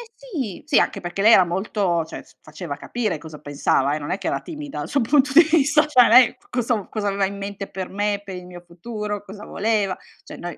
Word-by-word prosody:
sì. 300 - -6
Sì 300 -2 +4
anche - - -1
perché 175 +2 -4
lei 225 +2 +7
era 190 - +7
molto 180 -1 -1
cioè 160 - -9
s - - -24
faceva - - -7
capire 220 -8 -3
cosa 155 0 -11
pensava, 145 -1 0
eh, - - -4
non 145 - -5
è 185 - -1
che - - -5
era - - 0
timida 300 -2 -7
sul 280 - 0
punto 270 +3 +2
di 330 +4 +9
vista, 305 -1 +3
cioè 255 -5 +5
lei 255 -2 +7
c - - -32
cosa 235 -4 -1
cosa 210 -2 -3
aveva 200 0 +1
in 200 +1 -5
mente 200 0 -6
per 190 -1 -6
me, 205 0 -1
per 195 -2 -8
il 180 - -10
mio 180 -1 -11
futuro, 205 +4 -6
cosa 205 +1 -10
voleva, 205 -3 -1 0.3
cioè - - -11
noi 175 0 -7
205 Hz, 235 wpm, -22 LUFS, 180-250 Hz, 0.3 s, di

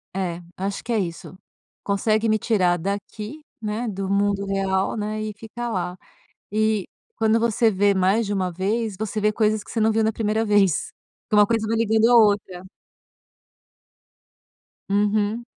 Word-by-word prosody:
É, 175 -2 -3
acho 195 +1 -4
que 235 - -2
é 220 - +2
isso. 175 -1 -5 0.5
Consegue 215 +2 +1
me 215 - +3
tirar 185 -6 +2
daqui, 205 - -5 0.2
né, 220 +2 -3
do 195 -2 -3
mundo 200 0 +1
real, 195 0 0
né, 215 0 -3
e 215 -1 -4
ficar 230 +3 -6
lá. 180 -2 -3 0.5
E, 215 -2 +1 0.3
quando 225 0 +2
você 230 0 +2
vê 200 +1 +3
mais 195 +4 +2
de 205 - -2
1 185 -2 -1
vez, 205 +4 -1
você 220 0 -3
vê 210 0 +3
coisas 215 -1 +1
que - - -12
você 230 - -2
não 220 +1 +3
viu 220 0 +1
na 220 - +2
1ª 220 0 0
vez. 205 -6 +2 0.4
Que 210 - +1
uma 205 -1 +6
coisa 225 -2 0
vai 225 - 0
ligando 220 0 +3
a - - +6
outra. 200 -4 +2 2.2
Uhum 210 +3 +1
210 Hz, 165 wpm, -23 LUFS, 195-220 Hz, 2.2 s, uma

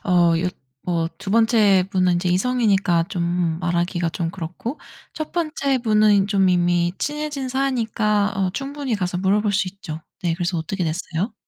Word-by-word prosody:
어 175 -3 +4
여 180 - 0 0.4
뭐 165 -2 0
2 195 +4 -6
번째 220 -4 +4
분은 185 -2 +2
이제 180 +1 -1
이성이니까 195 -4 +2
좀 175 -3 -1
말하기가 175 0 0
좀 165 0 -3
그렇고 185 - -6 0.4
1 310 -1 -5
번째 305 -5 0
분은 210 -4 +3
좀 195 -2 +2
이미 175 -1 +2
친해진 295 -3 -3
사이니까 225 -6 0
어 190 -1 +1
충분히 275 0 -3
가서 180 -3 -2
물어볼 200 +3 +2
수 195 -1 +1
있죠. 165 -5 -8 0.2
네 170 -2 +1
그래서 175 0 -2
어떻게 180 +2 -3
됐어요? 170 +6 -3
190 Hz, 310 characters per minute, -22 LUFS, 175-225 Hz, 0.4 s, 어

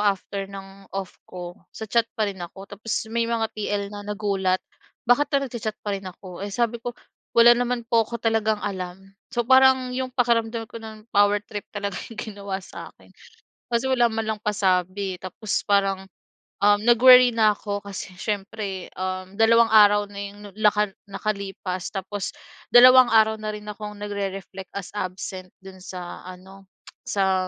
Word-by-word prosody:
after 195 -1 -1
ng 195 0 -11
off 195 -2 -5 0.2
ko, 175 -1 -8 0.2
sa 220 - -5
chat 230 +1 +1
pa 215 - +2
rin 195 -3 -5
ako. 190 +3 -8
Tapos 205 +3 -12 0.2
may 235 0 0
mga 230 -1 0
TL 205 -1 -3
na 205 - -6
nagulat, 200 -3 -1 0.4
bakit 245 +5 +3
pa 285 - +1
nagcha-chat 225 -4 -4
pa 205 - -1
rin 195 -1 -4
ako. 185 -1 -11
Eh, 200 - -4
sabi 235 +2 -1
ko, 240 0 -6 0.4
wala 235 +1 +9
naman 245 0 0
po 230 -1 +2
ko 235 - -3
talagang 220 -2 0
alam. 190 0 -6 0.2
So 240 -2 -1
parang 260 0 +5
'yong 260 0 -2
pakiramdam 230 -2 +1
ko 230 - -7
no'n, 220 -1 -10
power 205 0 +4
trip 205 -1 -7
talaga 200 -2 -4 0.2
ginawa 200 -3 -5
sa'kin. - - -12 0.6
Kasi 235 +2 +1
wala 240 -3 +3
man 220 0 -2
lang 215 -1 -2
pasabi, 190 -1 0
eh. - - -26
Tapos 195 +3 -3
parang, 195 -2 +2 0.6
um, 205 0 +5
nag-worry 250 +1 +8
na 215 -2 +4
ko 205 0 -4
kasi 200 -1 -7
siyempre 200 -1 -4
um, 185 +1 -4
dalawang 230 +1 +6
araw 205 -1 +6
na 200 - -8
'yong 200 0 -8 0.2
naka 210 -1 +3 0.2
nakalipas, 195 -2 -4
tapos 195 0 -4 0.3
dalawang 255 +1 +8
araw 220 -1 +4
na 215 0 -4
rin 210 - -9
akong 210 0 -7
nagre-reflect 195 -2 -5
as 200 -2 -5
absent 185 -1 -5 0.2
do'n 190 -1 -11
sa 180 -1 -8
ano, 190 +1 -12 0.4
sa 190 -2 +1
205 Hz, 165 wpm, -24 LUFS, 195-225 Hz, 0.6 s, wala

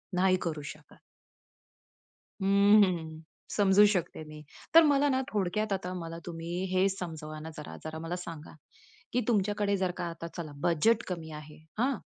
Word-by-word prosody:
नाही 185 +1 +4
करू 155 -3 -3
शकत. 155 0 -20 1.4
हं, 200 +2 +6
हं. 160 -4 -2 0.3
समजू 205 0 +5
शकते 175 -3 -3
मी. 155 0 -10 0.3
तर 330 - +10
मला 290 -1 +4
ना, 260 -1 +2
थोडक्यात 210 +1 0
आता 185 -1 -3
मला 165 -2 -6
तुम्ही 165 -1 -6 0.2
हे 185 +1 +4
समजावा 160 -5 -6
ना, 160 +1 -7
जरा 150 - -8
जरा 160 0 -6
मला 165 +2 -4
सांगा? 165 -4 -8 0.6
की 250 - +2
तुमच्याकडे 205 -2 +1
जर 185 -1 0
का - - -2
आता 165 0 -7
चला 160 -3 -5
बजेट 215 +8 +3
कमी 165 -3 -5
आहे. 150 0 -13 0.2
हां. 255 +1 +2
180 Hz, 160 wpm, -30 LUFS, 160-205 Hz, 1.4 s, तर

